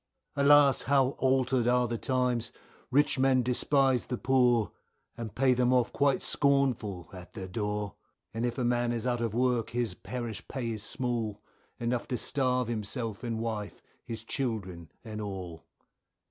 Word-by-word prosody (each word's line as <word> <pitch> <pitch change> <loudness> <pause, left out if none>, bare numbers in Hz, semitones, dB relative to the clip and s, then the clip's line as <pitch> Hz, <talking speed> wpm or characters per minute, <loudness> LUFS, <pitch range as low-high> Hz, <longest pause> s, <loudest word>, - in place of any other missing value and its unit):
Alas! 140 -1 +6
how 135 -1 +3
altered 130 -2 +2
are 125 0 +3
the 120 - -2
times, 125 -3 +1 0.4
rich 145 +1 +3
men 130 -1 +4
despise 130 +1 +2
the 125 - -2
poor, 125 -6 +3 0.4
And 115 -3 -7
pay 130 0 +4
them 125 0 +2
off 125 -2 +2
quite 140 -2 +2
scornful 125 - +1
at 90 -1 -11
their 95 - -6
door, 105 +1 -3 0.4
And 115 +1 -3
if 120 +1 -1
a 125 - 0
man 120 0 +1
is 115 0 -2
out 120 -1 0
of 115 -2 -2
work 125 -2 +1
his 120 -4 -1
parish 120 +2 -6
pay 125 -4 -3
is 110 -2 -4
small, 110 -2 -3 0.4
Enough 120 0 -1
to 125 - -2
starve 125 -1 0
himself 115 0 -3
and 115 -2 -2
wife, 110 -2 -4 0.2
his 115 -1 -6
children 95 - -3
and 110 -2 -6
all. 95 -5 -7
120 Hz, 160 wpm, -29 LUFS, 110-130 Hz, 0.4 s, Alas